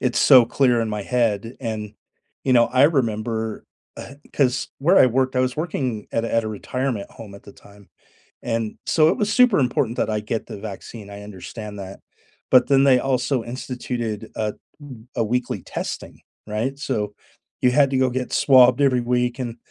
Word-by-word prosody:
it's 125 -2 0
so 130 -4 +7
clear 125 0 +2
in 115 - -1
my 105 -1 -3
head, 115 0 -1
and, 110 -3 -5 0.5
you 130 - +2
know, 120 -2 +5
I 130 +2 +3
remember, 115 -6 -1 0.3
uh 140 - -9 0.2
'cause 130 -3 +1
where 170 +8 +4
I - - +7
worked, 130 +1 0
I - - +3
was 130 0 -1
working 130 -9 -3
at 115 - 0
a 115 - -4
at 115 -1 +2
a - - -3
retirement 115 +1 -4
home 105 -3 -11
at 100 - -13
the 100 - -13
time, 100 -1 -19 0.5
and 115 -2 -2
so, 155 -1 +4
it 170 - +1
was 210 -1 -1
super 250 -2 +5
important 125 -3 0
that - - 0
I 105 0 -1
get 110 +1 -4
the - - -8
vaccine, 100 +1 -9
I 100 0 -9
understand 105 +1 -9
that, 95 0 -9 0.5
but 125 -1 +6
then 135 -1 +4
they 130 -2 +5
also 130 -1 0
instituted 120 -3 -5
a 105 -1 -2 0.3
m 125 -5 -12
a 115 - +1
weekly 125 +3 -2
testing, - - -6 0.3
right? 115 +6 -3
So, 105 -7 -3 0.5
you 125 - +5
had 140 0 +4
to 135 - 0
go 130 -1 +2
get 125 0 -4
swabbed 130 -1 +5
every 135 -3 +3
week 125 +1 -1
and 120 -2 -4
120 Hz, 190 wpm, -22 LUFS, 110-130 Hz, 0.5 s, so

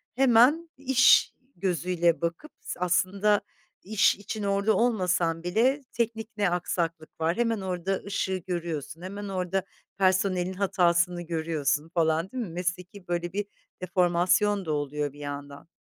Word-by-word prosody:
hemen 265 +6 +4
iş 265 -1 +5 0.2
gözüyle 175 -2 0
bakıp 170 - -3
s - - -6
aslında 190 +4 +2 0.4
iş 210 +1 +3
için 205 +1 -6
orada 200 +2 +2
olmasan 180 -8 +1
bile 245 +10 +1
teknik 225 -2 -2
ne 200 -3 +2
aksaklık 165 -2 -3
var? 165 +5 +1
Hemen 230 -3 0
orada 185 +1 -2
ışığı 190 -2 -1
görüyorsun, 165 -3 -4
hemen 200 +3 -6
orada 185 0 -1 0.3
personelin 185 -1 +2
hatasını 175 -2 +2
görüyorsun 160 -3 -1
falan, 165 +1 +1
değil 255 -2 -3
mi? 195 - -6
Mesleki, 180 +2 -5
böyle, 175 0 -2
bir 205 0 -1 0.4
deformasyon 185 +3 +2
da 155 - -2
oluyor 145 -1 -2
bir 145 - -15
yandan. 145 0 -7
180 Hz, 135 wpm, -27 LUFS, 170-205 Hz, 0.4 s, iş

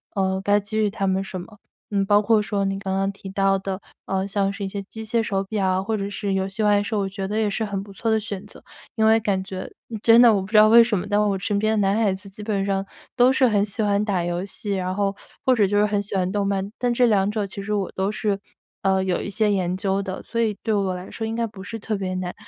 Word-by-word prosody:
嗯， 190 -1 0
该 205 +1 +3
给 205 +1 -5
于 210 - +2
他 200 -1 -2
们 190 0 +1
什 190 -1 -6
么。 210 +4 -13 0.4
嗯， 200 - +3
包 205 +1 +4
括 220 +1 +4
说 205 -1 -1
你 195 0 -2
刚 190 -1 -2
刚 195 +1 0
提 195 0 -10
到 195 0 +2
的， 190 0 -4 0.3
呃， 190 0 -1
像 195 0 0
是 200 0 -5
一 - - -2
些 200 +1 -4
机 220 +3 -9
械 230 +1 +1
手 195 -3 -1
表， 190 -2 0
或 220 +2 -1
者 200 -1 -3
是 200 0 -3
游 190 0 0
戏 205 +3 -3
外 205 -1 +4
售， 210 +1 -2
我 195 - 0
觉 195 0 -4
得 210 +2 -2
也 220 - +2
是 205 +2 -1
很 200 -2 -3
不 200 0 -12
错 225 +4 -2
的 220 0 +3
选 200 -3 -5
择。 - - -12 0.3
因 220 -1 +2
为 220 +1 +5
感 200 -3 -1
觉 190 -1 -6 0.3
真 230 +1 +6
的 240 -2 +8
我 200 - +1
不 190 - -7
知 215 +1 +2
道 215 0 +8
为 235 +1 +9
什 225 -3 0
么， 180 - -3
但 205 0 +2
是 210 - +3
我 195 -1 0
身 200 +2 -1
边 215 +1 +1
的 195 - +2
男 195 - +2
孩 200 - +3
子 190 +1 -7
基 195 +2 -12
本 205 -2 -1
上 195 -1 0 0.3
都 250 0 +5
是 265 -1 +4
很 205 -3 +2
喜 210 +2 -2
欢 205 0 +2
打 195 -5 0
游 175 +1 -2
戏， 200 +1 -5
然 185 -1 -2
后 200 0 0 0.3
或 260 - +5
者 215 -5 +3
就 205 +2 +1
是 205 - +4
很 205 -1 0
喜 205 0 -5
欢 185 -1 0
动 200 -1 0
漫， 195 -1 -1
但 245 -1 +1
这 245 +1 +3
两 205 -4 +3
者 210 -1 -1
其 200 +1 -7
实 210 +2 -3
我 200 -2 -2
都 190 +2 0
是， 205 -2 -1 0.4
呃， 190 -1 +2
有 185 -2 0
一 - - -5
些 210 +1 +1
研 185 -2 0
究 195 0 0
的， 190 -1 -5
所 230 - -2
以 215 -3 0
对 220 - 0
我 195 -3 0
来 180 +1 -8
说 225 - -4
应 225 - -3
该 230 0 0
不 210 -3 -9
是 225 - -6
特 220 0 -3
别 190 -2 -3
难。 185 -1 -3
200 Hz, 315 characters per minute, -23 LUFS, 195-215 Hz, 0.4 s, 为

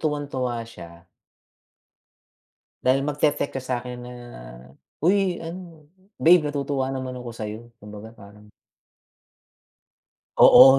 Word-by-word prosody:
tuwang-tuwa 140 -6 -1
siya 85 -4 -12 1.7
dahil 130 +2 +3
magte-text 145 0 +1
ka - - -7
sakin 125 -1 -3
na, 125 - -8 0.9
"Uy, 185 0 +2
ano, 165 -3 -9 0.3
babe, 170 -1 +6
natutuwa 140 -2 -1
naman 130 -1 -4
ako 125 -1 -6
sa'yo." 110 0 -5 0.2
Kumbaga 105 +2 -10
parang 105 0 -15 1.9
Oo, 135 0 +10
130 Hz, 95 wpm, -24 LUFS, 115-150 Hz, 1.9 s, Oo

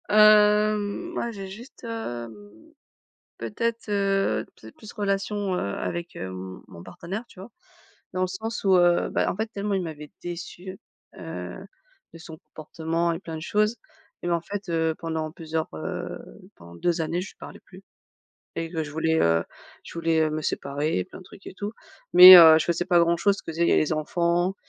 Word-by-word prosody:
Hem 210 - +4
moi 235 - -3
j'ai 195 -3 -8
juste, 220 +7 -12
hem, 115 - -8 0.7
peut-être, 225 - -3
heu, 195 - 0
peut 110 - -14
être - - -17
plus 215 - -12
relation, 200 -1 -2
heu, - - -1 0.2
avec, 170 0 -5
heu, - - -5
m 95 0 -8
mon 85 - -12
partenaire, 195 - -7
tu 185 - -15
vois? 195 +5 -10 0.6
Dans 185 - -1
le - - +2
sens 220 +5 -5
où, 190 -1 +4
heu, 175 -1 +3
bah, - - 0
en - - -4
fait 220 +2 -1
tellement 205 -2 -3
il 190 - 0
m'avait 150 -3 -8
déçue, 175 +2 -7 0.4
heu, - - -7 0.6
de - - -10
son 160 -1 -11
comportement 165 +2 -3
et 165 - -4
plein 165 -4 -7
de 155 - -7
choses, 210 +6 +1 0.5
même 175 - -1
en 170 - +1
fait, 195 +3 -7
heu, 160 -1 0
pendant 160 -1 -3
plusieurs, 160 -1 -4
heu, 80 - -5 0.4
pendant 85 0 -14
2 170 - 0
années, 165 +2 -2
je 185 - -7
lui - - -37
parlais - - -11
plus. - - -16 0.7
Et 165 -1 -3
que 165 -2 -2
je 145 - -9
voulais, 160 +1 0
heu, 80 0 +2 0.4
je - - -11
voulais, 165 -1 +1
heu, 155 - +1
me 155 0 -3
séparer 145 -2 -2
et - - -3
plein - - -13
de - - -15
trucs 190 - -16
et - - -9
tout. 205 +2 -5 0.4
Mais, 180 +1 +12
heu, 160 -2 +9
je - - -1
faisais 170 +1 -1
pas 180 -2 +4
grand 170 0 +3
chose, 200 +3 +1
je - - -8
faisais 170 +2 0
les 155 - +2
enfants, 170 +4 0
175 Hz, 195 wpm, -25 LUFS, 160-200 Hz, 0.7 s, Mais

